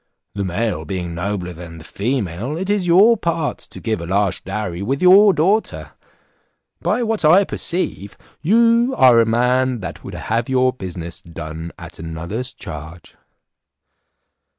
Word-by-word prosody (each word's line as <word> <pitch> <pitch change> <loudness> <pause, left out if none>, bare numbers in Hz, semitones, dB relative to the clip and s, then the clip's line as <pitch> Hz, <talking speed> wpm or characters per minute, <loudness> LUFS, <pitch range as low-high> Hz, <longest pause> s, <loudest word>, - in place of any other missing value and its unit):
The 100 0 -3
male 105 +5 -2
being 90 -3 -4
nobler 90 0 -3
than 85 0 -10
the 80 - -11
female, 110 - -3
it 190 +3 -2
is 200 -4 0
your 200 +7 +6
part 165 -4 -2
to - - -6
give 110 -5 -2
a 85 - -6
large 100 0 0
dowry 95 -3 -4
with 135 +7 -1
your 195 +3 +7
daughter. 195 +6 0 0.9
By 245 - 0
what 225 -4 0
I 175 +6 +6
perceive, 170 - -3 0.2
you 230 +7 +3
are 125 -3 +6
a 115 - +1
man 125 +2 +1
that 90 -2 -7
would - - -8
have 115 +2 -2
your 130 -1 +2
business 90 -6 -6
done 80 0 -8
at - - -10
another's 85 +10 -4
charge." 80 0 -10
115 Hz, 150 wpm, -19 LUFS, -, 0.9 s, your